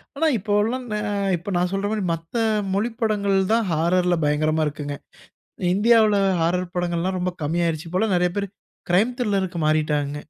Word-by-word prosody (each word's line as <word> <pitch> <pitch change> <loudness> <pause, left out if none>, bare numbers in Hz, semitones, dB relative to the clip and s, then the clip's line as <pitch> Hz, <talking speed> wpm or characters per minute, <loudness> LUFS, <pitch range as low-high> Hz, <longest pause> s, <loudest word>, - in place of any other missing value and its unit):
ஆனா 325 +3 0
இப்பவுல்லாம், 215 +5 0
நே 210 - -1 0.4
இப்ப 190 +4 -7
நான் 180 +1 0
சொல்றமாரி 205 +1 -1
மத்த 165 +6 -8 0.4
மொழிப் 225 +3 -2
படங்கள் 200 -3 +1 0.2
தான் 230 -2 +2
ஹாரர்ல 175 +2 +2
பயங்கரமா 155 +1 +1
இருக்குங்க. 145 -1 -5 0.8
இந்தியால 215 0 +4 0.2
ஹாரர் 180 +2 0
படங்கள்லாம் 175 +1 -1
ரொம்ப 180 0 -1
கம்மி 165 +4 -1
ஆயிருச்சு. 165 0 -2
இப்பலாம் 190 +2 +1
நிறைய 180 0 +2
பேரு 200 0 -1 0.4
க்ரைம் 210 +8 +3
த்ரில்லர்க்கு 195 -6 -1
மாறிட்டாங்க. 150 -2 0
180 Hz, 145 wpm, -23 LUFS, 165-210 Hz, 0.8 s, இந்தியால